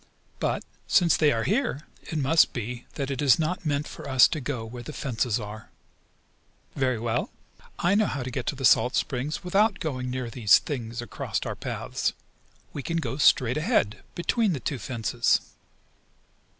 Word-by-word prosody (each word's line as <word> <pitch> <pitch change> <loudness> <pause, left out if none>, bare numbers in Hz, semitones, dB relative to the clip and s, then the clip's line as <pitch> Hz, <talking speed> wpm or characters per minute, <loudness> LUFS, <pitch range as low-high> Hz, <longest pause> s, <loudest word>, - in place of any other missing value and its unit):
But, - - -1 0.2
since 175 -3 +4
they 150 -2 +4
are 115 -3 0
here 225 - 0 0.2
it 160 - -5
must 150 +3 +4
be 120 +1 -5
that 140 -1 -3
it 135 - -2
is 140 -3 +5
not 170 +2 -2
meant 145 0 0
for - - -8
us 130 -2 +7
to 155 - -3
go 125 -4 -3
where 120 +2 -8
the 135 +6 -8
fences 125 -4 -1
are. 105 0 -8 1.1
Very 130 -3 +1
well. 115 +1 -1 0.5
I 175 +3 +2
know 210 0 +3
how 135 - -3
to 130 - -5
get 125 0 -4
to - - 0
the 135 0 -2
salt 120 +2 +5
springs 140 +3 -2
without 200 +3 +2
going 130 -6 -3
near 125 -2 -4
these 110 -4 +5
things 120 -4 -4
across 120 - -4
our - - -3
paths. - - -3 0.6
We 145 - -4
can 165 +5 -2
go 155 -4 -2
straight 130 -4 +4
ahead, 155 - +1
between 205 +4 +1
the 140 - -3
two 135 0 -3
fences!" 120 +1 +1
135 Hz, 175 wpm, -26 LUFS, 120-155 Hz, 1.1 s, us